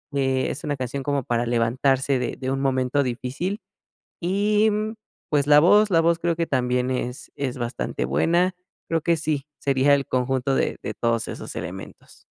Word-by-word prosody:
Eh, 130 -1 +1
es 150 - -7
una 145 -2 -2
canción 130 +2 -3
como 140 -2 0
para 120 0 -1
levantarse 130 +3 +1
de 125 - -2
de 130 0 -3
un 135 0 -1
momento 130 +1 +1
difícil 135 - -3 0.6
y, 205 +4 +2
mm, 215 +2 -2 0.3
pues, 145 -2 +2
la 150 0 +8
voz, 205 +5 +5
la 165 -1 +5
voz 170 0 +3
creo 170 -1 0
que 165 0 -1
también 125 -1 0
es 125 0 -4
es 135 -2 -3
bastante 65 - -3
buena. 170 - +2 0.3
Creo 165 -1 0
que 170 +1 +2
sí, 150 -2 -2
sería 140 +1 +3
el 140 -1 +2
conjunto 130 +1 0
de - - 0
de - - -4
todos 115 -1 0
esos - - -7
elementos. 95 +3 -8
135 Hz, 180 wpm, -24 LUFS, 125-165 Hz, 0.6 s, la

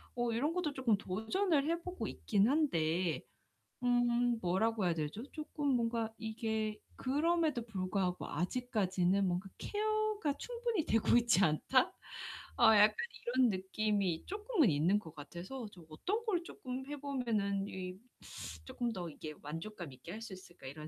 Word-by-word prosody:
어 240 -1 +1
이런 285 +8 +1
것도 340 -5 -1
쪼끔 255 -5 +3
도전을 280 - +1
해 340 0 0
보고 360 +1 -4
있긴 205 -1 +2
한데 175 - +2 0.6
음 245 -1 +3
뭐라고 195 +3 +1
해야 170 - +3
되죠? 160 +8 -3
쪼끔 300 -1 -4
뭔가 230 -1 0
이게 220 -1 -2 0.2
그럼에도 300 -2 +1
불구하고 185 -3 -1
아직까지는 190 - +1
뭔가 180 +2 -1
'케어가 430 -5 0
충분히 470 -7 -2
되고 225 +1 +3
있지 235 -5 +4
않다?' 195 - +3 0.7
어 235 - +5
약간 210 +1 +7 0.4
이런 255 -2 +6
느낌이 190 -2 0
쪼끔은 410 - +2
있는 165 +8 +3
것 160 -6 -10
같아서 175 - -7
좀 175 -3 -13
'어떤 415 - -2
걸 360 -5 +1
쪼끔 260 -4 -6
해 295 - -4
보면은 220 -8 0
이 185 0 -5 0.7
쪼끔 240 -1 -2
더 175 -4 -4
이게 155 0 -7
만족감 165 +2 -6
있게 130 +7 -10
할 220 - -6
수 225 - -7
있을까.' 180 -5 -13
이런 150 +3 -7
220 Hz, 295 characters per minute, -35 LUFS, 185-275 Hz, 0.7 s, 약간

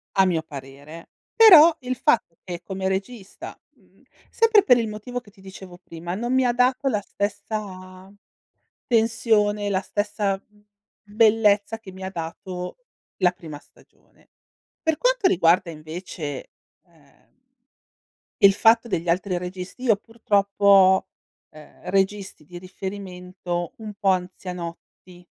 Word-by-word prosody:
A 195 - +5
mio 170 -4 0
parere. 140 +4 -11 0.3
Però 340 -8 +8
il 255 0 -3
fatto 190 -10 +1
che 175 -2 -7
come 190 -1 -4
regista, 195 +2 -6 0.2
mhmm, - - -29 0.3
sempre 445 -3 +4
per 250 -7 +5
il 230 -2 -1
motivo 215 +4 -6
che 205 - -20
ti 195 -2 -21
dicevo 190 -2 -12
prima, 175 0 -7
non 240 +4 -2
mi 260 -1 +3
ha 240 - +3
dato 255 +2 +1
la 210 -5 -1
stessa 195 -2 -6 0.8
tensione, 220 -3 +1
la 190 -1 0
stessa 205 0 -2 0.6
bellezza 210 0 +2
che 200 -4 -12
mi 190 0 -11
ha 190 - -4
dato 180 +1 -7 0.4
la 180 -2 +3
prima 155 -4 -10
stagione. - - -27 0.5
Per 320 -2 0
quanto - - +2
riguarda 170 0 +2
invece, 155 -2 -7 0.4
ehm, 150 -5 -28 1.1
il 195 0 +7
fatto 230 +2 +4
degli 170 -3 -3
altri 180 +1 0
registi, 180 +7 -8
io 225 -4 +4
purtroppo 205 -2 -2
ho, 190 -1 +6 0.4
ehm, 155 +3 -12
registi 195 -4 -1
di 175 +3 -10
riferimento 180 -2 -6
un 215 -2 -9
po' 200 -1 -2
anzianotti. 180 -1 -5
195 Hz, 130 wpm, -23 LUFS, 180-220 Hz, 1.1 s, Però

